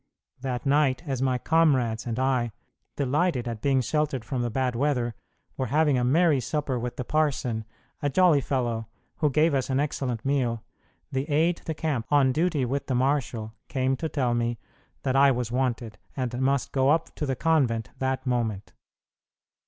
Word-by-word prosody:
That 125 -2 -3
night, 140 -1 +2
as 135 -2 -2
my 130 -1 +2
comrades 130 -8 +2
and 115 -1 -2
I, 130 -3 +1 0.4
delighted 140 -1 0
at 115 -2 -4
being 135 0 +2
sheltered 140 -1 -1
from 130 -4 -2
the 120 - -1
bad 125 +1 -1
weather, 125 -3 0 0.4
were 130 - -1
having 150 +2 +3
a 125 - +1
merry 150 +3 +4
supper 140 -1 -2
with 120 0 -4
the 125 - -3
parson, 130 -6 0 0.4
a 145 - +1
jolly 160 0 +4
fellow, 120 -5 -1 0.3
who 150 - +2
gave 155 +3 +3
us 135 -2 0
an 130 0 +1
excellent 135 -5 -2
meal, 125 -5 0 0.5
the 135 +3 -2
aide 165 +4 +2
de 160 - -3
camp 145 -8 -2
on 140 -3 +4
duty 155 -2 +1
with 140 +3 -2
the 130 - 0
marshal 125 -4 0
came 130 -1 0
to 160 - -3
tell 130 -6 0
me 120 0 0 0.5
that 130 -1 0
I 140 +1 +6
was 125 -3 -1
wanted, 120 -3 -2 0.2
and 125 -1 -2
must 135 0 +1
go 135 0 +2
up 160 +2 +1
to 150 - -3
the 135 - 0
convent 130 -8 +1
that 130 0 -1
moment. 115 -5 -2
130 Hz, 175 wpm, -26 LUFS, 120-145 Hz, 0.5 s, I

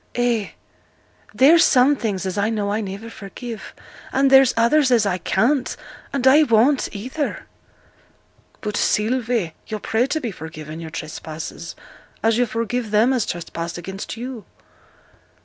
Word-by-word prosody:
'Ay, 240 -4 0 0.8
there's 320 +6 +6
some 270 +1 +5
things 205 -7 -3
as 185 - -3
I 205 +1 +1
know 210 -3 -1
I 215 +2 0
niver 200 +2 -6
forgive; 225 +3 -8 0.4
and 270 0 +2
there's 270 -1 +7
others 260 +5 +4
as 235 -4 +4
I 185 -2 0
can't 250 - +1 0.3
and 270 -2 -2
I 275 +4 +7
won't, 255 +1 +3
either.' 260 +8 -4 1.2
'But, 210 -1 -3
Sylvie, 225 -5 0
yo' 215 - -3
pray 225 +4 0
to 315 - -1
be 240 -7 -4
forgiven 155 -2 -8
your 165 -1 -7
trespasses, 155 +1 -7 0.5
as 225 +1 +3
you 245 - +2
forgive 230 +1 -2
them 220 +5 +3
as 245 -5 0
trespass 170 -1 -5
against 190 +5 -7
you.' 245 -2 -6
225 Hz, 145 wpm, -21 LUFS, 195-255 Hz, 1.2 s, there's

